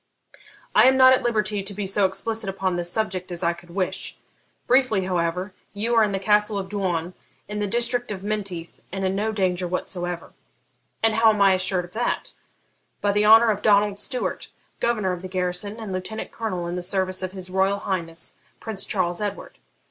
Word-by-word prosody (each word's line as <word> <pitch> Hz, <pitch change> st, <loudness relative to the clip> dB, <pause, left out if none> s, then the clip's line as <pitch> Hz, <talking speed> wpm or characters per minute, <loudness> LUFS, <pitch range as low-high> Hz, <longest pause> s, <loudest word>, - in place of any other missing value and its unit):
'I -, -, +7 dB
am 260 Hz, 0 st, +5 dB
not 260 Hz, 0 st, +8 dB
at 260 Hz, -, +3 dB
liberty 215 Hz, -3 st, 0 dB
to 195 Hz, +1 st, -5 dB
be 205 Hz, 0 st, -3 dB
so 195 Hz, +1 st, +3 dB
explicit 220 Hz, +2 st, -3 dB
upon 190 Hz, -1 st, -1 dB
this 175 Hz, 0 st, 0 dB
subject 185 Hz, -3 st, -2 dB
as 175 Hz, +1 st, -3 dB
I 170 Hz, 0 st, +2 dB
could 175 Hz, 0 st, -15 dB
wish. 185 Hz, +1 st, -2 dB, 0.5 s
Briefly, 245 Hz, -7 st, +3 dB
however, 180 Hz, +1 st, -1 dB, 0.2 s
you 220 Hz, +4 st, 0 dB
are 225 Hz, -1 st, +5 dB
in 210 Hz, -, +1 dB
the 195 Hz, -, 0 dB
Castle 210 Hz, +1 st, +2 dB
of 190 Hz, -1 st, -4 dB
Doune, 180 Hz, -4 st, -2 dB, 0.3 s
in 210 Hz, +1 st, -4 dB
the 205 Hz, -, 0 dB
district 240 Hz, +2 st, +1 dB
of 195 Hz, -2 st, -5 dB
Menteith, 200 Hz, -5 st, -3 dB
and 195 Hz, +1 st, -2 dB
in 190 Hz, -, +1 dB
no 215 Hz, +2 st, 0 dB
danger 185 Hz, -3 st, 0 dB
whatever.' 175 Hz, -1 st, -4 dB, 0.7 s
'And 225 Hz, -1 st, +4 dB
how 225 Hz, +1 st, +5 dB
am 210 Hz, -, -2 dB
I 195 Hz, -1 st, +6 dB
assured 185 Hz, -1 st, +1 dB
of 175 Hz, -, -16 dB
that?' 235 Hz, +5 st, -2 dB, 0.7 s
'By 205 Hz, -, +1 dB
the 210 Hz, +1 st, +2 dB
honour 225 Hz, +1 st, +8 dB
of 205 Hz, -1 st, -3 dB
Donald 205 Hz, -1 st, +3 dB
Stewart, 250 Hz, +3 st, -3 dB, 0.3 s
governor 215 Hz, -6 st, +1 dB
of 180 Hz, -1 st, -4 dB
the 185 Hz, -, -6 dB
garrison, 185 Hz, +3 st, -2 dB
and 215 Hz, -4 st, -5 dB
lieutenant 185 Hz, +4 st, -4 dB
colonel 185 Hz, -6 st, -3 dB
in 170 Hz, +1 st, -3 dB
the 180 Hz, -, -3 dB
service 185 Hz, 0 st, -1 dB
of 185 Hz, 0 st, -4 dB
his 185 Hz, -1 st, -7 dB
Royal 190 Hz, +1 st, +2 dB
Highness 170 Hz, -5 st, -4 dB, 0.2 s
Prince 215 Hz, -4 st, -2 dB
Charles 180 Hz, -1 st, 0 dB
Edward.' 205 Hz, -1 st, -5 dB
195 Hz, 195 wpm, -24 LUFS, 185-215 Hz, 0.7 s, not